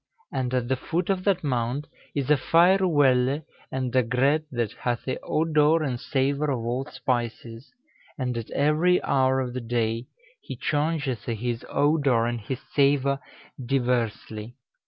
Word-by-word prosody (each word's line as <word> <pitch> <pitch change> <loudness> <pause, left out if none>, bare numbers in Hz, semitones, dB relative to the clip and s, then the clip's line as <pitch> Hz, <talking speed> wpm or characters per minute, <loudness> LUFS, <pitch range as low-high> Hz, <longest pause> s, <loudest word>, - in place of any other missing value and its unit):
And 125 -2 -1
at 125 -1 0
the 130 - +1
foot 170 +8 -1
of 185 -1 -1
that 190 -4 +2
Mount 130 +1 -1 0.3
is 140 0 0
a - - +7
fayr 175 +7 +4
welle 140 -1 +3 0.3
and 130 -1 -2
a 130 - +6
gret, 130 +6 +2
that 120 -4 -1
hathe 120 +1 -3
odour 155 0 +2
and 130 -5 -2
savour 140 +3 0
of 120 -4 -2
all 125 +3 -1
spices; 120 -2 -4 0.5
and 125 -3 -2
at 115 -2 -5
every 160 +5 +3
hour 130 0 +2
of 125 -1 -4
the 130 - -3
day, 115 0 -1 0.3
he - - -7
chaungethe 145 -7 -1
his 120 +1 -3
odour 140 -5 +2
and 120 -1 -2
his 125 +4 -5
savour 140 -1 +3 0.4
dyversely. 120 -3 -1
130 Hz, 150 wpm, -25 LUFS, 120-145 Hz, 0.5 s, a